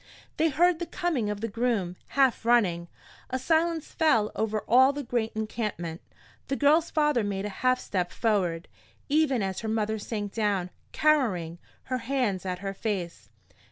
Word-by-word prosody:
They 320 +1 +3
heard 340 +3 +3
the 345 - -4
coming 325 -11 -1
of 210 0 -4
the 225 - -1
groom, 220 -5 -1 0.2
half 265 -4 +3
running. 195 -8 +2 0.4
A 260 - -1
silence 320 +3 0
fell 230 -11 +2
over 215 -1 -1
all 260 +4 +6
the 290 0 -4
great 235 -2 -1
encampment. 215 -7 -4 0.5
The 275 - -1
girl's 305 +4 +3
father 295 -6 +2
made 200 -1 -2
a - - -2
half 255 0 +3
step 180 -3 -2
forward, 185 -7 0 0.4
even 285 -6 +2
as 190 -1 -2
her 220 - -4
mother 220 0 -1
sank 205 -1 -4
down, 200 -5 0 0.2
cowering, 210 - +1 0.2
her 255 -1 -2
hands 230 -7 -1
at 180 -1 -2
her 195 - -2
face. 180 - -4
225 Hz, 160 wpm, -27 LUFS, 195-275 Hz, 0.5 s, all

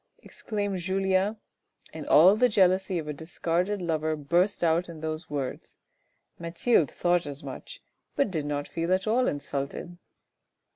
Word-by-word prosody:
" - - -50
exclaimed 205 -3 -4
Julien, 190 +3 +1 0.6
and 155 -2 -7
all 180 +7 +7
the 250 +3 +4
jealousy 190 -2 +3
of 155 -2 -4
a 150 - -3
discarded 175 +5 -2
lover 160 -2 0
burst 175 +7 +1
out 170 +2 +2
in 165 -2 -9
those 160 +1 -4
words, 140 -3 -5 0.6
Mathilde 170 - +2
thought 175 -2 +1
as 145 +1 -7
much, - - -8 0.3
but 280 -8 +1
did 155 -4 -2
not 145 -1 -2
feel 165 +1 -3
at 185 - -3
all 240 +4 +2
insulted. 145 +4 -4
175 Hz, 150 wpm, -27 LUFS, 155-190 Hz, 0.6 s, all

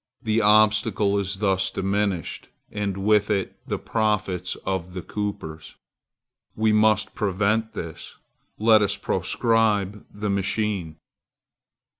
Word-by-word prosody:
The 110 0 +1
obstacle 105 -1 +3
is 100 0 -2
thus 95 -1 +1
diminished, 100 -2 -2 0.2
and 100 -2 -3
with 105 +1 +2
it 100 -3 -1
the - - -1
profits 105 -5 -1
of 95 -1 -3
the 90 - -5
coopers. 100 -7 -5 0.8
We 110 0 +2
must 110 0 +3
prevent 105 +3 0
this. 80 -2 -7 0.4
Let 110 0 +5
us 100 - +1
proscribe 105 -4 +1
the 105 0 -3
machine! 100 -4 -1
105 Hz, 110 wpm, -24 LUFS, 95-110 Hz, 0.8 s, Let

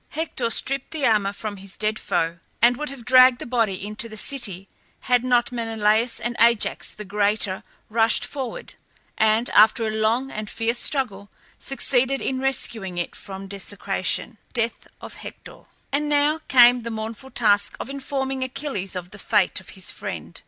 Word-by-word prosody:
Hector 295 -6 -2
stripped 275 +3 0
the 305 -4 -2
armour 210 -3 +3
from 205 0 -6
his 195 0 -11
dead 215 0 -1
foe, 170 0 -1 0.2
and 240 +1 +5
would 300 +4 -4
have 265 -4 -10
dragged 255 0 +7
the - - -7
body 225 -6 0
into 215 +2 -2
the 215 - -9
city 205 -8 -2 0.3
had 250 -1 +2
not 245 -1 +2
Menelaus 225 0 +1
and 240 0 -3
Ajax 235 -2 +3
the 210 - -8
Greater 205 -1 0 0.3
rushed 225 0 +2
forward, 265 -5 -5 0.4
and 220 +2 +2
after 220 +2 +5
a 215 - -1
long 225 +5 0
and 215 0 -5
fierce 230 +1 -1
struggle 205 -8 -2 0.3
succeeded 270 0 0
in 260 -1 -2
rescuing 225 -8 0
it 175 - -3
from 195 0 -8
desecration. 200 +2 -3
DEATH 230 -1 -2
OF - - -8
HECTOR. - - -11 0.3
And 295 +2 0
now 295 +2 +3
came 245 -1 +7
the 235 - -5
mournful 225 +4 -6
task 205 -5 +2
of - - -5
informing 270 -1 -3
Achilles 260 -8 -4
of 180 0 -6
the - - -11
fate - - +2
of - - -15
his - - -2
friend. - - -7
230 Hz, 165 wpm, -23 LUFS, 210-260 Hz, 0.4 s, dragged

